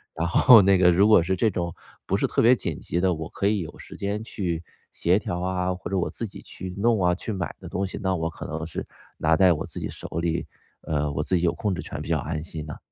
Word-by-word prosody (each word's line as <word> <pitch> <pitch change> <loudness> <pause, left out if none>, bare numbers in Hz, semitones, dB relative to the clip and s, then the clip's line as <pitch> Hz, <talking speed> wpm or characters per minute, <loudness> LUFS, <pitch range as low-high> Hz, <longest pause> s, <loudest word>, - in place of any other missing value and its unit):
然 85 +1 -1
后 115 +5 +8
那 95 0 +5
个 90 -1 +5
如 100 +5 +4
果 105 -5 +7
是 95 +2 0
这 110 +4 +2
种 85 -3 -3 0.3
不 - - +1
是 - - +1
特 - - +1
别 120 +3 +6
紧 85 - -4
急 85 - -2
的， 95 0 +2
我 80 0 -5
可 100 - -1
以 105 -1 +2
有 80 - -7
时 - - -11
间 100 +2 -2
去 85 -7 -3 0.3
协 90 +4 +2
调 90 -3 -4
啊， 90 0 -1
或 90 - -7
者 95 - +1
我 90 - 0
自 115 - -5
己 - - -11
去 90 0 -8
弄 110 0 +2
啊、 90 0 +4
去 110 - -5
买 95 -4 -4
的 - - -8
东 95 +1 -1
西， 95 - -6
那 95 -1 +1
我 80 -1 -1
可 80 - -9
能 80 +1 -4
是 80 - -5 0.3
拿 80 0 +3
在 95 -2 +6
我 75 - -4
自 - - -7
己 - - -3
手 - - -8
里， 85 0 -1 0.4
呃， 75 -1 -1
我 75 +1 -1
自 95 - 0
己 85 - -2
有 85 - +3
控 105 -3 -1
制 - - -4
权 - - -6
比 - - -7
较 - - +2
安 75 0 -3
心 80 -2 -7
的。 75 - -7
90 Hz, 295 characters per minute, -25 LUFS, 85-100 Hz, 0.4 s, 后